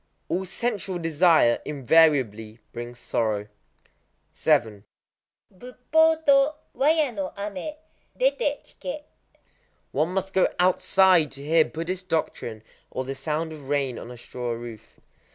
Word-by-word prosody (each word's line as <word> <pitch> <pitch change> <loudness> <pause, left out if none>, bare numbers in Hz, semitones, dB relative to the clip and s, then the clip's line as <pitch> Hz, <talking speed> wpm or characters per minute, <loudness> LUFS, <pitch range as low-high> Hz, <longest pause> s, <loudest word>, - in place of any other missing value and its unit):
All 185 +3 -1
sensual 200 -3 -2
desire 165 -6 +4
invariably 130 -7 +2 0.2
brings 120 0 -7
sorrow. 110 -3 -1 0.9
7—Buppō 250 - -1
to 280 +1 +5 0.2
wara 305 +4 +3
ya 300 -5 +2
no 195 -4 -4
amé, 205 +9 -5 0.4
dété - - +1
kiké. 295 +2 -7 0.9
One 160 +3 0
must 190 0 -2
go 190 - +4
outside 185 -2 +4
to 140 +1 -7
hear 160 +1 +4
Buddhist 180 +3 -5
doctrine 115 -9 -2 0.3
or 130 - -4
the 135 - -4
sound 155 +4 -3
of 145 -3 -11
rain 140 -4 0
on - - -9
a 125 - -9
straw 120 0 -5
roof. 115 -2 -10
165 Hz, 120 wpm, -25 LUFS, 125-195 Hz, 0.9 s, to